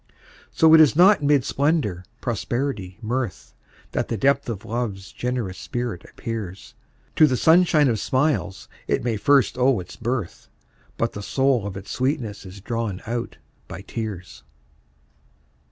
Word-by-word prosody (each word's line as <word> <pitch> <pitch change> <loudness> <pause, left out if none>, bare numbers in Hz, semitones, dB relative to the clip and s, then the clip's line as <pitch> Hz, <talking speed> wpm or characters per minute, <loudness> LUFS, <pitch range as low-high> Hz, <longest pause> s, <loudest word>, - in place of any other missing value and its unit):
So 160 0 +4
it 160 - +9
is 150 -2 +5
not 185 +2 +6
mid 145 -3 +3
splendor, 140 - 0 0.2
prosperity, 120 -4 -3
mirth, 120 -3 -3 0.4
That - - -1
the 115 - -2
depth 140 +3 +2
of 110 -4 -5
Love's 110 -5 -4
generous 120 -7 -3
spirit 120 -7 -4
appears; 105 -5 -6 0.4
To 155 - +7
the 130 -3 0
sunshine 160 -2 +5
of 115 -4 0
smiles 130 -8 -1 0.2
it - - 0
may 120 -2 0
first 135 +3 +3
owe 125 -3 +3
its 90 - -9
birth, 115 -5 -4 0.5
But - - -1
the 105 - -6
soul 130 -1 +1
of 100 -1 -6
its 95 - -9
sweetness 125 -7 -2
is 95 +1 -11
drawn 115 -3 -3
out 120 +1 -4 0.3
by - - -8
tears. 100 - -6
120 Hz, 145 wpm, -23 LUFS, 100-140 Hz, 0.5 s, it